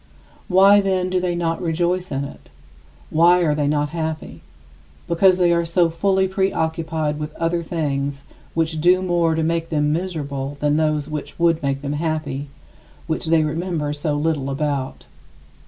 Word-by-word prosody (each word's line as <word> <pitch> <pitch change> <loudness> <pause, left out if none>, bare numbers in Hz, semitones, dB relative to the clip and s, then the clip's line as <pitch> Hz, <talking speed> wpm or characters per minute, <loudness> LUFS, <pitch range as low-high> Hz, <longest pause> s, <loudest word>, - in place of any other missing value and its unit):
Why, 195 +2 +6
then, 185 -2 0
do 185 - +2
they 180 -1 -1
not 165 -1 -1
rejoice 175 +2 -1
in 135 0 -1
it? 70 - -10 0.6
Why 175 +3 +5
are 155 -3 +2
they 150 -1 0
not 145 0 +1
happy? 160 -1 -5 0.7
Because 180 +2 +4
they 175 -2 +3
are 170 0 +2
so 170 0 +2
fully 190 +3 +1
preoccupied 160 -5 -1
with 150 0 -6
other 165 +1 0
things 140 -4 -2 0.3
which 160 -1 0
do 180 +2 +4
more 170 -3 +1
to 160 - 0
make 165 0 -1
them 150 -1 +1
miserable 145 -5 -4
than 150 0 +1
those 155 -2 0
which 150 -1 -6
would 170 -1 +2
make 140 -1 -2
them 140 0 -2
happy, 150 -3 -2 0.6
which 160 0 -3
they 160 -1 +4
remember 155 -1 -2
so 150 0 -2
little 145 -2 -1
about. 140 -1 -3
160 Hz, 160 wpm, -21 LUFS, 150-175 Hz, 0.7 s, Why